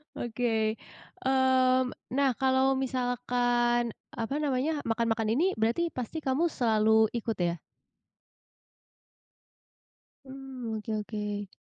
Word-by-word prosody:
Oke. 225 Hz, -2 st, 0 dB, 0.5 s
Mmm, 260 Hz, -1 st, +3 dB, 0.2 s
nah 275 Hz, +1 st, +3 dB
kalau 265 Hz, +1 st, +2 dB
misalkan 245 Hz, -2 st, 0 dB, 0.2 s
apa 230 Hz, +4 st, -3 dB
namanya, 285 Hz, +2 st, 0 dB
makan-makan 225 Hz, -1 st, 0 dB
ini 345 Hz, +11 st, +2 dB
berarti 230 Hz, +10 st, +1 dB
pasti 260 Hz, 0 st, -5 dB
kamu 310 Hz, +4 st, 0 dB
selalu 220 Hz, -2 st, +3 dB
ikut, 230 Hz, -1 st, -2 dB
ya? 170 Hz, -1 st, +1 dB, 2.7 s
Mmm, 265 Hz, -4 st, -7 dB
oke 215 Hz, +1 st, -6 dB
oke. 205 Hz, -1 st, -4 dB
245 Hz, 95 wpm, -29 LUFS, 225-265 Hz, 2.7 s, Mmm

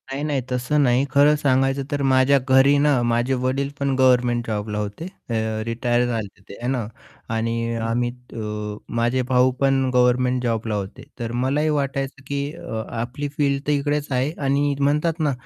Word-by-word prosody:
नाही, 140 Hz, +2 st, -3 dB
नाही. 145 Hz, -3 st, 0 dB
तसं 125 Hz, +4 st, 0 dB
नाही 125 Hz, +1 st, +3 dB
खरं 145 Hz, +1 st, +5 dB
सांगायचं 135 Hz, 0 st, +2 dB
तर 145 Hz, -1 st, -1 dB
माझ्या 135 Hz, +1 st, +4 dB
घरी 135 Hz, +2 st, +5 dB
ना, 145 Hz, -3 st, +3 dB
माझे 120 Hz, +2 st, +1 dB
वडील 135 Hz, +2 st, 0 dB
पण 140 Hz, -1 st, 0 dB
गव्हर्नमेंट 125 Hz, -2 st, +3 dB
जॉबला 105 Hz, -1 st, -3 dB
होते, 105 Hz, +9 st, -4 dB, 0.2 s
अ, -, -, -2 dB, 0.3 s
रिटायर 120 Hz, +1 st, 0 dB
झाले 110 Hz, -5 st, -4 dB
ते -, -, -8 dB
आहे 120 Hz, -, -4 dB
ना, 120 Hz, -5 st, -2 dB, 0.5 s
आणि 115 Hz, +1 st, -1 dB, 0.2 s
अ, 115 Hz, -, -3 dB
आम्ही 120 Hz, +1 st, 0 dB, 0.2 s
अ, 105 Hz, -1 st, -5 dB, 0.2 s
माझे 120 Hz, +2 st, +1 dB
भाऊ 130 Hz, 0 st, +4 dB
पण 135 Hz, -1 st, +2 dB
गव्हर्नमेंट 125 Hz, 0 st, +3 dB
जॉबला 115 Hz, -2 st, -1 dB
होते. 100 Hz, -1 st, -5 dB, 0.2 s
तर 115 Hz, -1 st, -3 dB
मलाही 145 Hz, +4 st, +1 dB
वाटायचं 140 Hz, -2 st, -2 dB
की 140 Hz, 0 st, -2 dB
अ, 110 Hz, -6 st, -5 dB, 0.2 s
आपली 125 Hz, +5 st, -4 dB
फील्ड 140 Hz, -2 st, +1 dB
तर -, -, +2 dB
इकडेच 145 Hz, 0 st, 0 dB
आहे 130 Hz, +3 st, +1 dB
आणि 140 Hz, +1 st, +1 dB
म्हणतात 150 Hz, +4 st, +1 dB
ना 150 Hz, -2 st, +1 dB
130 Hz, 175 wpm, -22 LUFS, 120-140 Hz, 0.5 s, खरं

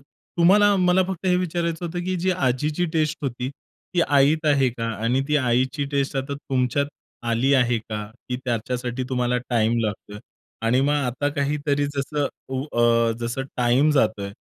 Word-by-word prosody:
तुम्हाला 195 Hz, +8 st, +2 dB
मला 180 Hz, 0 st, +3 dB
फक्त 190 Hz, 0 st, -4 dB
हे 180 Hz, -, +4 dB
विचारायचं 170 Hz, -1 st, -2 dB
होतं, 175 Hz, +1 st, -4 dB
की 185 Hz, 0 st, -1 dB
जी 180 Hz, +2 st, 0 dB
आजीची 150 Hz, +1 st, 0 dB
टेस्ट 155 Hz, -1 st, 0 dB
होती, 125 Hz, -1 st, -3 dB
ती 175 Hz, +5 st, -6 dB
आईत 145 Hz, +3 st, +3 dB
आहे 140 Hz, -3 st, +4 dB
का? 115 Hz, -1 st, -5 dB, 0.2 s
आणि 125 Hz, +4 st, +2 dB
ती 150 Hz, -, +3 dB
आईची 130 Hz, +2 st, +1 dB
टेस्ट 140 Hz, 0 st, 0 dB
आता 135 Hz, +1 st, -2 dB
तुमच्यात 135 Hz, 0 st, 0 dB, 0.4 s
आली 120 Hz, +4 st, +2 dB
आहे 120 Hz, -3 st, +3 dB
का? 105 Hz, -1 st, -5 dB, 0.2 s
की 125 Hz, -, -1 dB
त्याच्यासाठी 120 Hz, +1 st, -2 dB
तुम्हाला 125 Hz, -1 st, 0 dB
टाईम 115 Hz, 0 st, +2 dB
लागतोय? 105 Hz, 0 st, -5 dB, 0.5 s
आणि 125 Hz, +3 st, +3 dB
मग 145 Hz, +2 st, +2 dB
आता 140 Hz, 0 st, -1 dB
काहीतरी, 145 Hz, 0 st, 0 dB
जसं 145 Hz, +1 st, -1 dB, 0.2 s
उ 130 Hz, 0 st, -2 dB
अ, 115 Hz, -1 st, +3 dB
जसं 120 Hz, +3 st, -2 dB
टाईम 125 Hz, +5 st, +3 dB
जातोय, 110 Hz, -8 st, +1 dB
135 Hz, 160 wpm, -23 LUFS, 120-150 Hz, 0.5 s, हे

